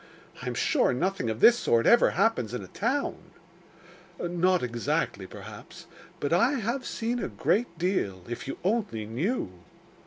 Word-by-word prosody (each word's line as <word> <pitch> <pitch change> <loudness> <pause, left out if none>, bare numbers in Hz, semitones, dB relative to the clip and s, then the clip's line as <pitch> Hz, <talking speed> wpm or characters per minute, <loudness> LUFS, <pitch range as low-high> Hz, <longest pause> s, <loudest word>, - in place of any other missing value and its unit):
I - - -6
am - - -2
sure - - +2
nothing 155 -2 -1
of 110 +1 -4
this 240 0 +7
sort 115 -1 +2
ever 235 - +6
happens 185 - +1
in 105 - -4
a - - -10
town.' 260 - -1 1.0
'Not 175 0 +1
exactly, 120 -3 -1
perhaps. - - -11 0.3
But 145 +3 -1
I 235 +11 +4
have 250 +1 -2
seen 235 +2 -2
a - - -2
great 225 -2 0
deal 160 - -1
if 120 +2 -6
you 135 - -4
only 195 - -1
knew! 130 - -2
180 Hz, 155 wpm, -28 LUFS, -, 1.0 s, this